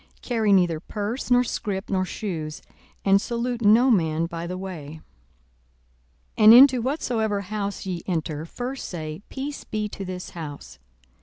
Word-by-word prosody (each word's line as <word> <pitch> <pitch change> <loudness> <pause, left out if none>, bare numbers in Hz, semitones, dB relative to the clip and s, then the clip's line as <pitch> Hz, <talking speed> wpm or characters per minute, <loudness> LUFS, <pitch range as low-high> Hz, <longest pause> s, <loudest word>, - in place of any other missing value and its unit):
42:010:004 - - -31
Carry 225 -4 +1
neither 175 -4 +3
purse, 210 +9 -4
nor 245 0 +5
scrip, 200 -4 -3
nor 185 -1 +1
shoes: 165 -6 -5 0.4
and 195 0 +5
salute 240 +1 -3
no 230 +5 +5
man 165 -5 +2
by 170 0 -5
the 180 +1 -4
way. 160 -5 -7 1.4
42:010:005 - - +4
And 215 +1 +10
into 255 -1 +8
whatsoever 225 -6 -1
house 200 0 -4
ye 180 -3 -3
enter, 160 -4 -2
first 250 +8 -5
say, 155 -1 -6
Peace 280 +2 -5
be 215 -1 -3
to 200 - -7
this 180 -1 -6
house. 145 - -8
200 Hz, 155 wpm, -24 LUFS, 170-235 Hz, 1.4 s, And